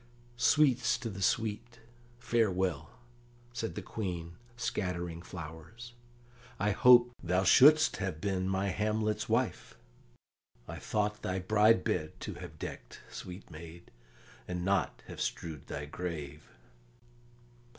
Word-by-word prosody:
"Sweets 125 -1 +3
to 115 - -5
the 95 0 -7
sweet: 110 +3 -1 0.4
farewell!" 95 -9 0 0.6
said 115 -1 -4
the - - -5
Queen, 90 -6 -4 0.3
scattering 90 -7 -3
flowers. 90 +8 -9 0.7
"I 105 +1 +2
hoped 120 +2 +6
thou 90 +2 +1
shouldst 150 - +6
have 95 -6 -3
been 95 0 -1
my 95 +1 0
Hamlet's 105 +1 -1
wife; - - -1 0.9
I - - -7
thought 105 0 -1
thy 90 - -2
bride 105 +2 +4
bed 80 0 -2
to - - -5
have - - -10
decked, - - -8
sweet 90 +2 -9
maid, 85 +2 -11 0.6
and 90 0 -3
not 100 0 0
have - - -8
strewed 80 -3 -4
thy 75 - -5
grave." 75 -2 -6
95 Hz, 120 wpm, -31 LUFS, 85-115 Hz, 0.9 s, hoped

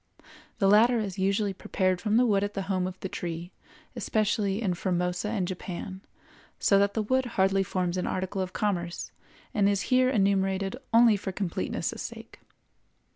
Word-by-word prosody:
The 195 - +2
latter 230 +4 +5
is 195 -4 -4
usually 195 +1 +1
prepared 185 -1 -1
from 210 +3 +2
the 250 - +5
wood 200 -4 +2
at 205 0 -3
the 195 - -2
home 185 -1 -1
of 185 0 -8
the - - -3
tree, 170 -1 -5 0.4
especially 210 -2 0
in 200 -6 0
Formosa 180 +1 -1
and 200 -5 -1
Japan, 185 +1 -6 0.6
so 200 - +4
that 200 0 +1
the 220 - +1
wood 260 +4 +1
hardly 195 0 +3
forms 185 -1 -1
an 180 - -1
article 190 +1 -2
of 185 -1 -3
commerce 175 -4 -2 0.4
and 200 -2 +3
is 200 -1 +1
here 255 0 +5
enumerated 195 -3 +1 0.2
only 230 -2 +6
for 195 -1 -4
completeness' 185 -2 -2
sake. - - -8
195 Hz, 170 wpm, -28 LUFS, 185-210 Hz, 0.6 s, only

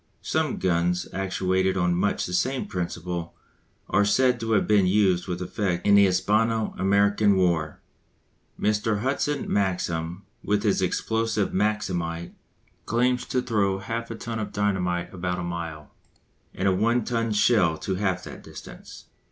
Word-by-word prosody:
Some - - 0
guns 90 0 0
actuated 95 0 0
on 90 -1 +2
much 95 +4 0
the 90 - -6
same 130 +9 0
principle 85 -1 -4 0.5
are 100 +2 +3
said 125 +4 +3
to 115 -1 -1
have 100 - +3
been 105 -3 +4
used 95 -2 +2
with 90 0 -3
effect 90 -2 -2
in 100 - +5
the 100 0 +7
Hispano 110 +4 +1
American 100 +1 +3
war. 85 -4 0 0.8
Mr. 105 0 0
Hudson 140 +3 -1
Maxim 90 -2 -1 0.2
with 105 0 0
his 100 -3 +2
explosive 110 +2 0
"maximite" 90 -5 -1 0.5
claims 125 +2 +1
to 125 -1 0
throw 100 -6 +1
half 115 +4 -4
a 115 - -5
ton 115 0 -5
of 105 -1 -4
dynamite 95 -4 -1
about 90 -1 -2
a 90 - -4
mile, 85 -3 -6 0.6
and 95 - 0
a 95 - +4
one 115 +3 +1
ton 115 -2 -1
shell 105 -6 +3
to 95 - -3
half 95 -1 -1
that - - -9
distance. - - -11
100 Hz, 150 wpm, -25 LUFS, 90-110 Hz, 0.8 s, the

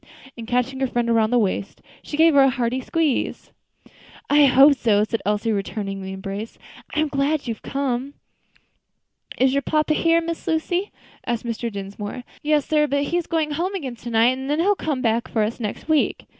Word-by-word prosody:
and, 230 -2 -8
catching 250 +2 0
her 265 - +1
friend 240 -1 0
round 220 -1 +2
the 245 - +3
waist, 200 -2 -1 0.2
she 295 - -6
gave 325 0 +5
her 280 - +6
a 270 - +6
hearty 250 0 -1
squeeze. 310 -1 -1 0.8
"I 290 0 +6
hope 270 +3 +7
so," 215 -6 +2
said 220 0 -2
Elsie, 210 +2 0
returning 195 -1 -3
the 190 0 -6
embrace. 195 +3 -6 0.4
"I 305 - +2
am 310 - +1
glad 285 +1 0
you 230 - -1
have 215 - -16
come." 275 0 -3 1.2
"Is 260 +1 +3
your 280 - +2
papa 305 +2 +1
here, 330 +1 +3
Miss 335 0 -5
Lucy?" 350 +5 -1 0.4
asked 240 -1 -2
Mr. 235 0 -3
Dinsmore. 205 +4 -6 0.2
"Yes, 295 -1 +1
sir; 300 -1 +2
but 280 0 0
he's 345 +3 -1
going 315 -2 0
home 350 +6 -2
again 270 -10 -4
to 240 - -8
night, 230 +2 +3
and 265 +1 -6
then 300 +2 +1
he'll 395 +5 +3
come 295 -9 -3
back 230 0 +1
for 220 - 0
us 220 +4 -3
next 215 -3 -5
week." 315 -2 +1
260 Hz, 200 wpm, -22 LUFS, 225-300 Hz, 1.2 s, hope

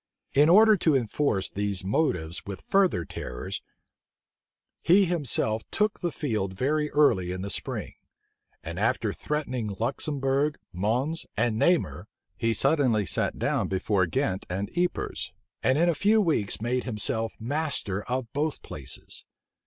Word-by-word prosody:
In 145 +3 +5
order 215 +4 +7
to 160 -4 +3
enforce 115 -4 0
these 100 -2 -2
motives 90 - 0
with 100 -2 -7
further 185 - +3
terrors, 60 0 -5 1.2
he 190 +3 +5
himself 135 -10 0
took 210 0 0
the 175 -2 -1
field 110 -11 -2
very 150 +7 0
early 115 -13 +3
in 95 +1 -4
the 100 - -3
spring; - - -4 0.7
and 85 +2 -5
after 110 -1 +1
threatening 130 -9 -3
Luxembourg, 140 +4 0 0.2
Mons, 125 - -1
and 115 0 +1
Namur 95 - +1 0.3
he 115 -1 0
suddenly 120 -5 +2
sat 80 - -1
down - - 0
before 95 0 +1
Ghent 95 +3 -1
and 95 +3 -3
Ypres, 175 0 -2 0.3
and 130 +2 +3
in 170 +3 +3
a 170 - +4
few 210 +8 +3
weeks 155 - +1
made 125 +3 -1
himself 110 -1 -1
master 125 -6 -1
of 125 -2 -3
both 150 +1 -1
places. 70 -4 -7
120 Hz, 135 wpm, -27 LUFS, 100-150 Hz, 1.2 s, order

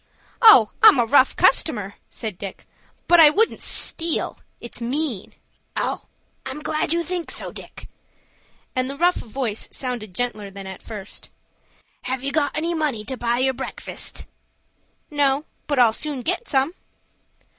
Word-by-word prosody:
"Oh, 340 - +8
I'm 435 -9 +8
a 240 - +3
rough 265 +2 +4
customer!" 210 -10 +2 0.2
said 215 -6 -6
Dick. 195 -2 -8 0.4
"But 345 0 +6
I 310 -2 +9
wouldn't 430 +9 +1
steal. 330 -1 +1 0.2
It's 240 0 -9
mean." 250 -4 -2 0.4
"I'm 265 +3 -6
glad 310 -1 -1
you 340 0 +1
think 350 0 -4
so, - - -1
Dick," - - -11 0.9
and 255 0 0
the 280 - -6
rough 355 +3 +3
voice 230 -2 -4
sounded 240 -7 -5
gentler 215 -4 -3
than 195 0 -10
at 190 -1 -9
first. 205 -3 -9 0.8
"Have 260 0 -3
you 275 - -1
got 290 -2 0
any 335 +2 -1
money 295 -10 -2
to 260 - -2
buy 240 -1 -1
your 265 +1 +1
breakfast?" 260 +1 -5 0.9
"No, 285 0 +1 0.2
but 285 - -1
I'll 235 -3 +5
soon 290 0 -3
get 365 - -2
some." 275 +4 +1
265 Hz, 145 wpm, -22 LUFS, 230-310 Hz, 0.9 s, I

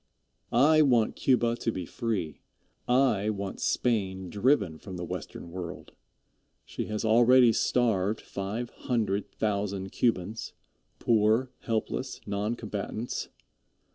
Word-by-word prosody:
I 150 +6 +5
want 120 -7 +3
Cuba 120 -3 +2
to 115 - -1
be 95 -4 -5
free. 95 - -3 0.5
I 125 -5 +3
want 100 -2 -4
Spain 95 -6 0
driven 100 - +2
from 95 -3 -8
the 90 - -5
Western 85 0 -7
World. 90 -1 -7 0.7
She - - -5
has 105 +1 -3
already 120 +2 +6
starved 110 -4 +1
five 105 +5 -5
hundred 105 -6 -1
thousand 100 -2 -2
Cubans 110 -2 -1 0.4
poor, 115 +3 +2
helpless 110 -2 -2
non 105 +3 -1
combatants. 110 +1 -4
110 Hz, 110 wpm, -28 LUFS, 100-120 Hz, 0.7 s, already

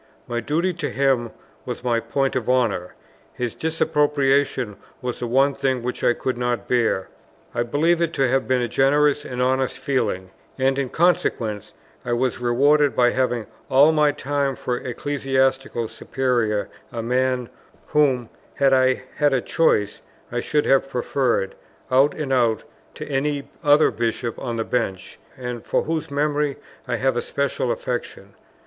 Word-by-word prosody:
My 120 0 -2
duty 165 +9 0
to 165 -3 -3
him 130 -4 +1 0.3
was - - -6
my 120 -2 +1
point 135 +4 -1
of 125 -2 -2
honour; 115 -8 +1 0.4
his 120 -2 -3
disapprobation 145 -7 +1 0.2
was 125 -1 -4
the 120 - -3
one 135 +4 +3
thing 130 -3 -1
which 125 +1 -4
I 120 - +4
could 125 0 -3
not 120 -1 -1
bear. 115 -6 +1 0.4
I 120 - 0
believe 155 +8 +1
it 170 -1 +1
to 135 - +2
have 135 +2 +1
been 130 -1 +2
a - - 0
generous 145 +4 +3
and 125 0 -2
honest 130 0 0
feeling; 105 -9 -1 0.3
and 135 +1 +1
in 135 -2 -1
consequence 115 - 0 0.3
I 120 - -2
was 125 0 0
rewarded 140 +4 +3
by 120 -1 +4
having 120 -3 0 0.2
all 140 +4 +6
my 150 -2 +3
time 140 -1 -1
for 125 0 -3
ecclesiastical 130 -2 -1
superior 115 -6 -1 0.2
a 115 -2 -4
man, 125 0 0 0.4
whom, 130 -6 +2 0.3
had 135 -1 +3
I 130 0 +3
had 145 -2 +3
a - - +2
choice, 105 -11 +1 0.3
I 120 - -1
should 150 +4 0
have 135 0 +3
preferred, 125 -5 0 0.4
out 135 +3 +4
and 145 -4 -2
out, 120 -4 +2 0.3
to - - -7
any 140 0 -1 0.2
other 145 +1 +5
Bishop 115 +1 -2
on 120 -3 -3
the 115 - -1
Bench, 110 -6 -3 0.2
and 125 -2 -5
for - - 0
whose 160 -1 -2
memory 145 0 0 0.3
I 125 - 0
have 130 +1 +1
a 120 - 0
special 140 +3 -1
affection. - - -4
130 Hz, 160 wpm, -22 LUFS, 120-145 Hz, 0.4 s, all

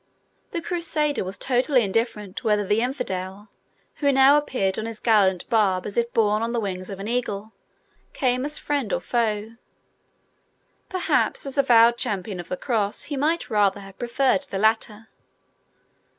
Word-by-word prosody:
The 335 - -4
Crusader 310 - -1
was 190 +2 -6
totally 255 0 +2
indifferent 210 0 -2
whether 210 -2 +1
the 210 +3 +1
infidel, 200 -5 -4 0.5
who 285 -2 +2
now 270 +1 +6
approached 250 -10 0
on 220 - -4
his 225 -1 -7
gallant 195 -6 +2
barb 200 -6 +2
as 205 - -5
if 235 0 0
borne 215 -1 +2
on 230 +1 -2
the 235 - 0
wings 185 -3 -4
of 195 -1 -7
an 200 - -5
eagle, 220 -3 -3 0.6
came 255 -1 0
as 295 +1 +1
friend 280 -8 -2
or - - +1
foe 225 -1 -2 1.3
perhaps, 370 -5 0
as 275 - -5
a 280 - +5
vowed 235 -2 +5
champion 200 -5 -2
of 175 - -8
the 180 - -3
Cross, 215 -6 -1
he 290 - -5
might 315 +5 -1
rather 205 -2 +2
have 195 -1 -14
preferred 260 +3 +1
the 195 - -3
latter. 220 +1 0
225 Hz, 165 wpm, -24 LUFS, 200-260 Hz, 1.3 s, now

